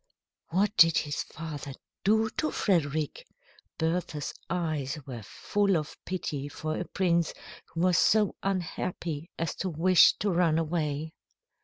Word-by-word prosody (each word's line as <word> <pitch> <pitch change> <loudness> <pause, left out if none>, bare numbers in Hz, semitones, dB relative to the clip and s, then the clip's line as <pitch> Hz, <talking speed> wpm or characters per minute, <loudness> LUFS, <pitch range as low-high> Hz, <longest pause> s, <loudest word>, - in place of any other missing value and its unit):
"What 200 +5 +1
did 165 -2 +7
his 145 -1 -1
father 150 -4 -7 0.3
do 220 +2 +3
to 310 +5 -1
Frederick?" 155 - 0 0.5
Bertha's 160 -2 -1 0.2
eyes 155 -5 -1
were 125 -4 -6
full 200 - 0
of 150 -1 -4
pity 145 -6 -3
for 155 +1 -4
a - - -3
prince 170 -3 +1 0.3
who 165 - -4
was 180 0 +4
so 210 -2 +4
unhappy 175 -3 -3
as 165 -2 -1
to 190 - -2
wish 175 +2 +6
to 205 0 0
run 170 -3 +3
away. 160 -1 -1
165 Hz, 135 wpm, -29 LUFS, 155-185 Hz, 0.5 s, did